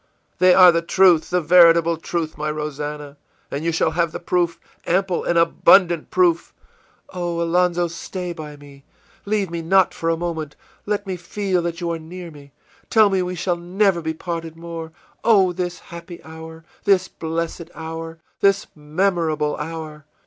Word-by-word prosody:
î 185 - +4
ìThey - - +5
are 180 -1 +9
the 170 0 0
truth, 170 -2 +4
the 180 - +1
veritable 170 0 +5
truth, 165 0 -4
my 150 +1 -3
Rosannah, 150 -1 -5 0.3
and 140 +2 -4
you 170 - 0
shall 160 0 +1
have 170 0 0
the - - -6
proof, 175 -1 -1 0.3
ample 185 0 0
and 170 - 0
abundant 170 0 +4
proof!î 345 -2 +1 0.6
ìOh; 175 -1 -2
Alonzo, 175 +1 +1
stay 175 +1 -6
by 155 -3 -9
me! 140 -1 -16 0.4
Leave 200 -3 -1
me 170 -1 -3
not 185 +2 +3
for 165 - -2
a 165 - +1
moment! 160 -3 -4 0.3
Let 205 0 -1
me 190 -2 -4
feel 185 +1 -2
that 170 0 -4
you 170 -1 -1
are 165 - -3
near 170 +2 -9
me! 140 -2 -15 0.4
Tell 215 -3 +5
me 190 -1 +1
we 180 0 -3
shall 175 0 -1
never 180 +1 +1
be 160 0 -3
parted 165 -1 -5
more! 165 -1 -7 0.3
Oh, 195 -6 +4
this 175 0 -3
happy 170 0 -11
hour, 160 0 -11 0.2
this 190 -2 +3
blessed 165 0 -5
hour, 165 0 -7 0.2
this 200 0 +3
memorable 155 -1 -1
hour! 155 -1 -7
170 Hz, 170 wpm, -21 LUFS, 160-180 Hz, 0.6 s, are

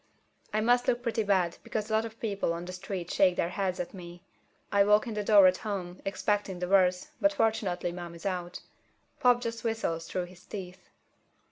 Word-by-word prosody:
I 215 - +1
must 245 +2 +3
look 240 0 +1
pretty 230 -2 0
bad 190 -5 +1
because 215 0 -4
a - - 0
lot 220 +1 +2
of 225 0 -9
people 200 -6 -1
on 170 +1 -5
the 180 - -7
street 180 -1 -5
shake 185 -2 +4
their 170 - 0
heads 185 -1 -2
at 175 - -4
me. 175 -1 -10 0.5
I 200 0 +5
walk 210 +2 +4
in 230 - -4
the 210 0 -2
door 205 -2 +7
at 185 0 +5
home, 190 -4 -5
expecting 200 -1 -1
the 180 0 -3
worst, 185 +5 +3
but 300 0 +4
fortunately 215 -9 0
Mom 175 -1 -7
is 170 - -12
out. 180 -2 -3 0.6
Pop 245 -3 +4
just 230 -1 -4
whistles 220 -8 -2
through 180 -1 -2
his 175 0 -16
teeth. 185 -2 -9
195 Hz, 205 wpm, -29 LUFS, 180-220 Hz, 0.6 s, door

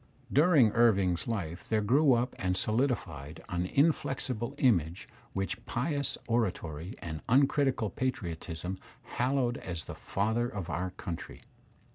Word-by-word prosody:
During 145 -6 +6
Irving's 100 -7 +3
life 90 -6 -4
there 110 -1 +2
grew 135 +6 +5
up 120 +1 +1
and 90 -1 0
solidified 95 - -1
an 90 +1 -1
inflexible 135 - 0
image 90 - +2 0.3
which 95 0 -3
pious 140 +1 -1
oratory 95 -7 -1
and 80 -2 -5
uncritical 135 -3 +3
patriotism 90 -6 -3 0.2
hallowed 125 -1 0
as 85 -4 -5
the - - -6
father 110 +4 -1
of 95 -6 -5
our 90 +2 -1
country. 90 -2 -7
110 Hz, 120 wpm, -30 LUFS, 90-125 Hz, 0.3 s, During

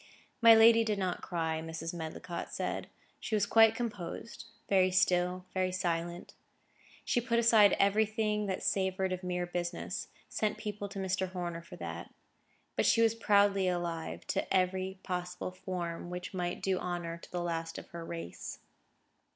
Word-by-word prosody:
My 230 -1 +9
lady 225 +1 +7
did 215 -2 0
not 185 -2 -1
cry, 160 -2 -2
Mrs. 165 +1 -5
Medlicott 170 +1 -5
said. - - -3 0.3
She 220 - -2
was 205 -1 +2
quite 225 +1 +6
composed; 220 -3 -5 0.2
very 185 -2 +4
still, 180 -1 +2
very 185 -1 +1
silent. 175 -1 -2 0.7
She 240 - +2
put 235 -1 0
aside 225 -3 +6
everything 210 +1 +2
that 190 -1 -2
savoured 190 -1 0
of 185 - -4
mere 180 -1 -2
business: 175 +2 -3 0.2
sent 215 -1 -1
people 205 -1 -5
to 200 - -9
Mr. 190 -1 -1
Horner 175 -2 -4
for 170 - -11
that. - - -6 0.6
But - - +2
she 230 - +5
was 225 -1 +4
proudly 200 -3 +3
alive 175 -2 -3
to - - -1
every 190 0 +1
possible 180 0 -3
form 175 -2 -5
which 180 +2 -6
might 175 -1 -3
do 190 -1 +1
honour 175 -1 -4
to - - -14
the 175 -1 -2
last 165 -1 -3
of - - -9
her 170 -1 -7
race. 165 - -6
185 Hz, 160 wpm, -32 LUFS, 175-205 Hz, 0.7 s, My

